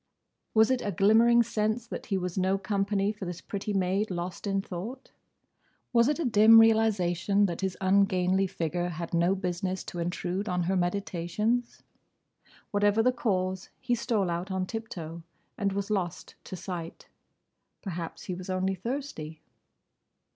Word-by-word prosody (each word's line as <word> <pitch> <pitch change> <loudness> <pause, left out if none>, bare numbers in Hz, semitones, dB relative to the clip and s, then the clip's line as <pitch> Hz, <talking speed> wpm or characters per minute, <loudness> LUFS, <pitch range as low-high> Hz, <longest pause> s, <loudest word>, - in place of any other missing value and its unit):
Was 220 +3 +5
it 255 -1 +1
a 205 - -2
glimmering 225 +6 +5
sense 220 0 -1
that - - -7
he 200 -4 0
was 180 -1 -3
no 190 +1 +1
company 200 0 0
for 210 -2 -7
this 175 -1 -5
pretty 200 +2 -4
maid 195 +2 0
lost 180 +2 -4
in 195 0 +1
thought? 200 +8 -7 0.8
Was 235 0 +5
it 295 - +1
a 335 - -2
dim 225 -1 +7
realisation 205 -3 +3
that 175 -2 -3
his 190 -1 -2
ungainly 190 -1 +3
figure 175 +1 -2
had 170 0 -6
no 170 +3 +3
business 185 0 -3
to 175 - -7
intrude 180 +3 -2
on 180 -1 0
her 190 +3 0
meditations? 195 +5 -1 0.9
Whatever 205 +2 +3
the 255 - +4
cause, 190 -6 -1
he 245 -1 -1
stole 215 -6 0
out 175 +3 -3
on 190 -1 -1
tip 225 +3 -5
toe 165 -1 -7 0.3
and 200 -1 0
was 200 +1 -3
lost 180 -5 -2
to - - -6
sight. 175 -2 -7 0.8
Perhaps 170 -4 -5
he 185 - -4
was 180 +1 -7
only 185 +1 0
thirsty. 190 - -5
195 Hz, 155 wpm, -28 LUFS, 180-215 Hz, 0.9 s, dim